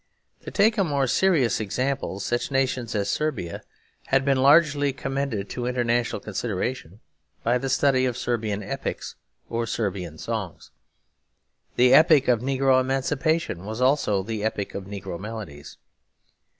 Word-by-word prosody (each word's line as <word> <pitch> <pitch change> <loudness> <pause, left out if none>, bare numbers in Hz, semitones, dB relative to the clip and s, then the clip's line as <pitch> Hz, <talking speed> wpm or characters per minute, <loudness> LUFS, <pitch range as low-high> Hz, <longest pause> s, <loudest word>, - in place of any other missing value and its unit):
To - - -8
take 215 +1 +2
a - - +4
more 140 -5 0
serious 135 - +2
example, 125 0 -2
such 120 +3 -2
nations 130 -4 -1
as 100 -1 0
Serbia 130 - -2 0.5
had 135 0 +2
been 135 -1 +3
largely 145 -1 +4
commended 135 -6 -3
to 120 -1 -3
international 120 -1 0
consideration 110 -1 -4 0.4
by 120 +2 +2
the 135 - -3
study 130 -1 +3
of 125 -2 -1
Serbian 110 -4 -2
epics, - - -5 0.3
or 115 0 -2
Serbian 95 -8 -3
songs. - - -5 1.0
The 125 +1 +5
epoch 155 -4 +6
of 120 -3 +3
negro 135 0 +2
emancipation 135 - -1
was 110 +3 -6
also 125 -7 +2
the 110 0 -4
epoch 105 -2 -2
of 100 - -6
negro 95 -3 -6
melodies. 105 -9 -8
125 Hz, 135 wpm, -25 LUFS, 105-135 Hz, 1.0 s, epoch